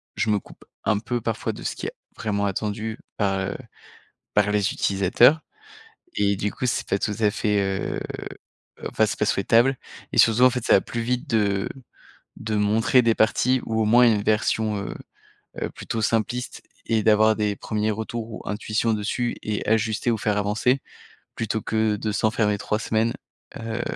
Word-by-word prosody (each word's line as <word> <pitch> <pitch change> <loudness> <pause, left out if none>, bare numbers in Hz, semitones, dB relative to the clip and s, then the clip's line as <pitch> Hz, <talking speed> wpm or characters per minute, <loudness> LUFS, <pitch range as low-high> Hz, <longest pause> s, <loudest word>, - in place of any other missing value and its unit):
je 110 - 0
me 105 -1 +3
coupe - - -17 0.2
un 105 - +2
peu 120 +2 -2
parfois 115 -1 -2
de - - -10
ce - - -3
qui - - -5
est - - -5 0.2
vraiment 100 -2 -1
attendu 110 +3 -3 0.2
par, 95 -2 +1
heu, 95 - -3 0.8
par 105 0 +3
les 105 -2 +1
utilisateurs 100 - +4 0.7
et 100 -1 +1
du 105 +1 -2
coup 125 - -3
c'est 120 - -1
pas 95 - +1
tout 105 - -1
à 105 -2 +4
fait, 105 0 0
heu, 95 0 -2 0.9
enfin, - - +2
c'est - - -4
pas - - +1
souhaitable 120 +6 +3 0.4
et - - -1
surtout, 115 +2 +5
en 130 - +8
fait, 125 -2 -3
ça - - +5
va - - +6
plus 120 - -4
vite 125 +1 -2
de 100 -3 +1 0.7
de 110 -1 -3
montrer 110 +5 +3
des 115 -1 +3
parties 125 +3 +2
ou 110 0 0
au - - +2
moins 120 +3 +6
une 105 -3 +2
version, 110 0 +1
heu 100 - -5 0.7
heu, - - -2
plutôt 115 -1 -4
simpliste 115 +3 -1 0.2
et 110 -1 +1
d'avoir 110 0 +5
des 105 -1 0
1ers 110 0 -1
retours 110 +1 -5
ou 110 - -8
intuitions 110 +2 -1
dessus 110 +3 -2
et 105 -1 -3
ajuster 110 +1 +1
ou 115 - 0
faire 105 0 0
avancer, 110 +6 +1 0.6
plutôt 110 -1 -2
que 110 -1 0
de 105 +1 -2
s'enfermer 110 -1 +1
3 105 +1 -2
semaines, 110 +1 0 0.4
heu, 115 +1 -4
110 Hz, 180 wpm, -24 LUFS, 105-115 Hz, 0.9 s, en